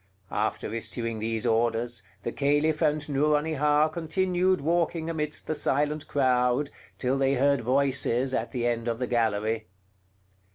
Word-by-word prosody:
After 105 0 -2
issuing 115 0 -2
these 110 +1 -2
orders, 115 +1 +1 0.2
the 120 - -2
Caliph 145 +3 +1
and 150 -1 +1
Nouronihar 150 +1 +2
continued 180 +3 0
walking 165 +1 0
amidst 150 -2 -3
the - - -1
silent 150 +1 0
crowd, 130 +1 +1 0.3
till 130 +1 0
they 135 0 +2
heard 140 +2 +2
voices 130 0 +1
at 115 -2 -1
the 120 -2 -2
end 120 -1 -1
of 115 -1 -1
the 125 - -1
gallery. 110 -2 0
135 Hz, 135 wpm, -27 LUFS, 120-150 Hz, 0.3 s, Nouronihar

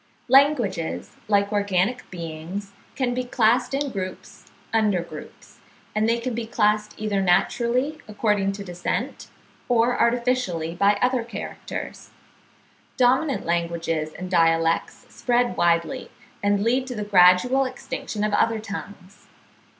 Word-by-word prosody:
Languages, 265 - +2
like 200 0 +2
organic 205 +3 0
beings, 170 +3 -6 0.2
can 255 -3 0
be 255 +1 -1
classed 245 +1 +2
in 280 0 -1
groups 185 -3 -7 0.2
under 210 -6 +2
groups; - - -12 0.3
and 215 +1 +1
they 230 - +2
can 240 +1 -3
be 230 0 -4
classed 210 -1 +1
either 210 -2 -1
naturally 240 - +1
according 210 -2 0
to 200 0 -7
descent, 180 -2 -4 0.4
or 240 0 +2
artificially 235 -9 0
by 200 +3 +3
other 250 -1 +2
characters. 235 - -7 0.9
Dominant 260 +3 +2
languages 170 -2 -1
and 185 0 -6
dialects 165 -1 +2
spread 245 0 0
widely, 170 +9 +1 0.3
and 205 0 +2
lead 255 +3 +1
to 250 - -5
the 210 - -3
gradual 205 +7 +5
extinction 255 -4 -5
of 210 -1 0
other 225 +2 +2
tongues. 200 -2 -9
210 Hz, 125 wpm, -24 LUFS, 185-245 Hz, 0.9 s, gradual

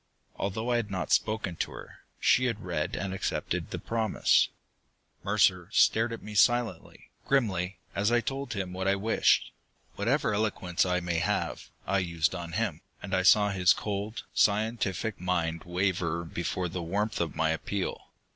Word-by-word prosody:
Although 110 +5 -2
I 120 - +3
had 115 -3 -2
not 95 -2 -3
spoken 110 -5 +1
to - - -1
her, - - -11 0.2
she 130 - +4
had 115 -4 -2
read 80 -4 -2
and 95 -1 -3
accepted 95 - -2
the - - -4
promise. 115 -1 +2 0.8
Mercer 90 -2 +2
stared 115 +2 +4
at 115 - -6
me 105 - -8
silently, 115 -4 +1 0.2
grimly, 95 -9 +1 0.2
as 105 +3 +1
I 120 - +4
told 135 +4 -4
him 95 -3 -4
what 95 +1 -2
I 100 - +4
wished. 110 +3 +2 0.5
Whatever 120 +4 +1
eloquence 95 -4 0
I 90 0 +1
may 85 -1 -1
have, 85 - -2 0.2
I 100 +1 +1
used 85 -2 0
on 85 -1 -6
him, - - -1 0.2
and 95 - -6
I 95 - +3
saw 105 +2 +5
his 90 -2 +4
cold, 105 +3 -4
scientific 105 -1 +1
mind 85 -3 -1
waver 85 -2 -1
before 85 +2 -2
the 90 +1 -4
warmth 100 +5 -1
of 80 -3 -2
my 80 0 +2
appeal. 95 +4 -3
95 Hz, 165 wpm, -29 LUFS, 90-110 Hz, 0.8 s, saw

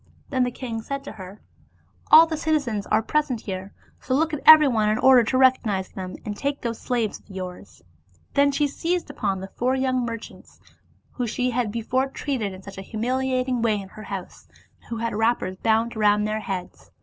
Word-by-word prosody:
Then 260 -3 +1
the - - -1
king 235 -3 -5
said 275 +4 -5
to - - -8
her, 195 -1 -11 0.3
" - - -33
All 320 +1 +10
the 325 -1 -3
citizens 285 -10 -1
are 215 +1 +2
present 295 -3 0
here, 190 0 -6 0.3
so 260 - -1
look 320 +3 +1
at 300 - -3
everyone 270 -9 +7
in 215 - +1
order 255 -1 +6
to 255 - 0
recognize 230 -7 +2
him, 185 -1 -7
and 205 - -4
take 280 +5 -3
those 230 -1 -3
slaves 235 -4 -1
of - - -28
yours." 185 -2 -8 0.5
Then 280 0 +4
she 290 +1 +1
seized 335 +3 -2
upon 195 -8 -2
the 190 - -8
four 255 +2 +2
young 260 -1 0
merchants, 230 -1 -8 0.5
whom 245 -2 -3
she 250 +3 -1
had 240 -3 -1
before 235 +4 -1
treated 265 -6 -3
in 190 0 -11
such 195 0 -9
a - - -5
humiliating 255 +3 -1
way 220 -3 +1
in 195 -1 -9
her 215 - -11
house, 195 -2 -7 0.3
and - - -27
who 230 - -4
had 230 +1 -2
wrappers 220 -4 0
bound 225 +3 +1
round 210 -1 +3
their 215 0 -1
heads. 190 -5 -6
235 Hz, 200 wpm, -24 LUFS, 210-265 Hz, 0.5 s, All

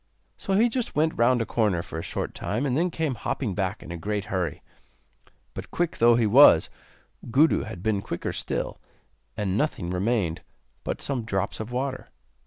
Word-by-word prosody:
So 195 - -3
he 220 +5 +5
just 240 0 -3
went 160 +1 +2
round 120 0 +3
a - - -7
corner 105 -6 0
for 80 - -6
a - - -3
short - - -4
time, 115 +7 -2
and 130 -3 0
then 170 +5 +2
came 160 -4 -1
hopping 115 -1 -3
back 95 +1 -2
in - - -9
a 85 - -5
great 105 +3 -3
hurry. 90 -5 -2 0.9
But, - - -7
quick 175 -1 -1
though 120 0 +6
he 115 -1 +2
was, 105 - +7 0.6
Gudu 145 +7 +3
had 85 - -8
been 110 -3 +1
quicker - - -4
still, - - -3 0.6
and 95 -3 -1
nothing 100 - -1
remained 90 -3 0 0.4
but - - -4
some 135 -4 -1
drops 100 -2 -2
of 110 +2 -5
water. 130 +1 -3
115 Hz, 185 wpm, -26 LUFS, 95-140 Hz, 0.9 s, was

